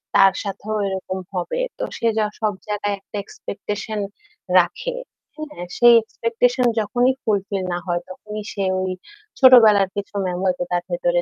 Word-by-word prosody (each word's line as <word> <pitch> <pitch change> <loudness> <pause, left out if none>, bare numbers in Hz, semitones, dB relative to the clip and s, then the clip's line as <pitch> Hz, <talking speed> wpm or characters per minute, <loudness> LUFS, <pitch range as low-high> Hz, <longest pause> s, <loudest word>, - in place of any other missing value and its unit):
তার 195 -1 +7
সাথেও 205 +2 -4
এরকম 190 -1 -4
হবে। 185 - -2 0.2
তো - - -4
সে 230 - 0
জা 215 - +3
সব 215 -2 0
জায়গায় 205 -1 -1
একটা 195 - -14
এক্সপেকটেশন 205 +1 -5 0.6
রাখে। - - -1 0.4
হ্যাঁ 300 -12 -7
সেই 240 0 +8
এক্সপেকটেশন 235 +3 0
যখনই 245 +5 +2
ফুলফিল 200 -2 -1
না - - -1
হয় 175 -1 0
তখনই 210 +3 -7
সে 200 - -2 0.2
ওই 185 0 -1 0.5
ছোটবেলার 225 -7 +7
কিছু 205 0 -5
মেমো 180 0 -2
হয়তো 180 -1 +1
তার 175 0 0
ভেতরে 175 0 +1
205 Hz, 150 wpm, -21 LUFS, 190-230 Hz, 0.6 s, সেই